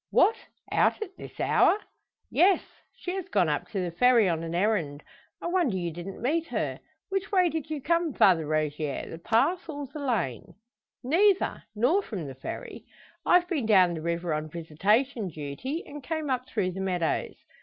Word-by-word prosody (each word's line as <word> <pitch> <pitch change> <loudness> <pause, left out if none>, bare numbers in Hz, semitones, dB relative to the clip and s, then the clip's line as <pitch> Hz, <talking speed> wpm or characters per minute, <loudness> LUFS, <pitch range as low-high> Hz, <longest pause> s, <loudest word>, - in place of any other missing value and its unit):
"What! 450 - +4 0.4
Out - - +3
at 380 -3 -12
this - - -11
hour?" - - +4 0.5
"Yes; 375 0 +4 0.3
she 360 - -5
has 380 -2 -4
gone 190 -6 +2
up 150 - -1
to 200 - -3
the 180 -2 -2
Ferry 235 +3 +5
on 165 -2 0
an 165 0 -4
errand. 175 -7 0 0.4
I - - -8
wonder 345 - +1
you 175 -2 -2
didn't 175 +4 -7
meet 325 +6 +1
her! - - -2 0.3
Which 390 0 -2
way 365 -3 +4
did 315 -1 -4
you 310 -2 -3
come, 335 +1 +1
Father 175 - +4
Rogier 150 -1 -1
the 165 - -7
path 320 - +1
or 290 -2 -4
the 285 +3 -9
lane?" 205 - -2 0.5
"Neither 375 +9 +3
nor 260 - +3
from 200 - -6
the 135 - -6
Ferry. 130 - -7 0.4
I've 355 0 +5
been 300 - -1
down 185 -5 +5
the 160 - -5
river 170 0 -1
on 155 +1 -3
visitation 200 - 0
duty, 155 - -5
and 290 0 -9
came 310 0 -2
up 255 0 -2
through 185 - 0
the 190 +2 -5
meadows. 180 -3 -1
220 Hz, 180 wpm, -27 LUFS, -, 0.5 s, Ferry